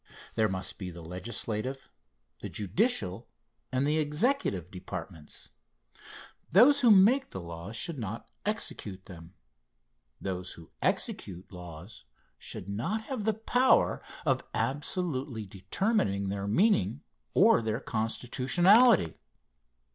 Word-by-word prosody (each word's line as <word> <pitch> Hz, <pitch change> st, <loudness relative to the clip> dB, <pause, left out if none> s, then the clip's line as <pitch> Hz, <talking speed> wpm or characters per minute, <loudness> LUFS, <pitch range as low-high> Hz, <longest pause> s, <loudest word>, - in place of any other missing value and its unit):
There 110 Hz, -1 st, +2 dB
must 95 Hz, 0 st, -4 dB
be 95 Hz, -2 st, -4 dB
the 85 Hz, -1 st, -10 dB
legislative, 110 Hz, +8 st, -4 dB, 0.5 s
the -, -, -6 dB
judicial 105 Hz, -, 0 dB, 0.4 s
and 130 Hz, +2 st, +1 dB
the 150 Hz, +2 st, +2 dB
executive 150 Hz, -, 0 dB
departments. 90 Hz, -4 st, -8 dB, 1.0 s
Those 250 Hz, -, +7 dB
who 245 Hz, -4 st, +5 dB
make 215 Hz, -, +5 dB
laws 85 Hz, +3 st, -6 dB
should 145 Hz, +6 st, -1 dB
not 115 Hz, 0 st, -5 dB, 0.2 s
execute 105 Hz, -, -3 dB
them. 85 Hz, -1 st, -12 dB, 0.8 s
Those 90 Hz, -2 st, -4 dB
who 80 Hz, -1 st, -14 dB
execute 90 Hz, -1 st, -1 dB
laws 90 Hz, +2 st, -10 dB, 0.4 s
should 90 Hz, -, -8 dB
not 125 Hz, -, -2 dB
have 220 Hz, -2 st, -5 dB
the 220 Hz, -2 st, +2 dB
power 245 Hz, +4 st, +3 dB, 0.2 s
of -, -, +1 dB
absolutely 135 Hz, -, -2 dB
determining 100 Hz, -, -1 dB
their 100 Hz, 0 st, -3 dB
meaning 105 Hz, -, +2 dB, 0.3 s
or -, -, +6 dB
their 110 Hz, 0 st, -1 dB
constitutionality. 130 Hz, -, +3 dB
110 Hz, 110 wpm, -29 LUFS, -, 1.0 s, Those